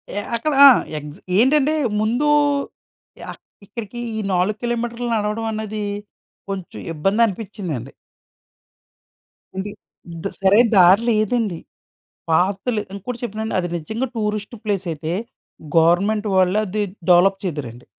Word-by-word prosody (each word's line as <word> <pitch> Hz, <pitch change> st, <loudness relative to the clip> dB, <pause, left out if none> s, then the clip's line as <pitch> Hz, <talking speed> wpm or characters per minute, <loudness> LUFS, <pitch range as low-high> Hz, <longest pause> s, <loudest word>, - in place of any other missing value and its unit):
ఎ -, -, +1 dB, 0.2 s
అక్కడ 270 Hz, +7 st, -1 dB
ఆ! -, -, +13 dB, 0.3 s
ఎగ్జ్ 150 Hz, +1 st, -8 dB, 0.2 s
ఏంటంటే, 280 Hz, +6 st, +4 dB, 0.3 s
ముందు 235 Hz, +7 st, 0 dB, 1.1 s
ఆహ్, -, -, -12 dB, 0.3 s
ఇక్కడికి 230 Hz, +2 st, -7 dB, 0.2 s
ఈ -, -, -1 dB
4 185 Hz, +4 st, +1 dB
కిలోమీటర్లు 240 Hz, 0 st, -2 dB
నడవడం 210 Hz, +1 st, -1 dB
అన్నది 215 Hz, 0 st, -4 dB, 0.7 s
కొంచెం 195 Hz, -3 st, -6 dB
ఇబ్బంది 195 Hz, +8 st, +1 dB
అనిపించిందండి. 185 Hz, -, -5 dB, 1.7 s
ఇది 205 Hz, +2 st, -4 dB, 0.4 s
ఇద్ 170 Hz, +4 st, -4 dB
సరైన 205 Hz, +5 st, +5 dB
దారి 185 Hz, +4 st, +6 dB
లేదండి. 215 Hz, -4 st, 0 dB, 0.7 s
పాత్‌లు 195 Hz, +7 st, +1 dB
ఇంకోటి 230 Hz, +5 st, -6 dB
చెప్పానండి, 220 Hz, -1 st, -3 dB
అది 175 Hz, -1 st, -2 dB
నిజంగా 220 Hz, +11 st, -3 dB
టూరిస్ట్ 210 Hz, +1 st, -3 dB
ప్లేసైతే, 170 Hz, -6 st, -2 dB, 0.6 s
గవర్నమెంట్ 195 Hz, +6 st, +3 dB
వాళ్ళే 185 Hz, +2 st, +3 dB
అది 210 Hz, +3 st, -2 dB, 0.3 s
డెవలప్ 190 Hz, +2 st, +5 dB
చేద్దురండి. 130 Hz, -8 st, -5 dB
205 Hz, 110 wpm, -21 LUFS, 180-225 Hz, 1.7 s, ఆ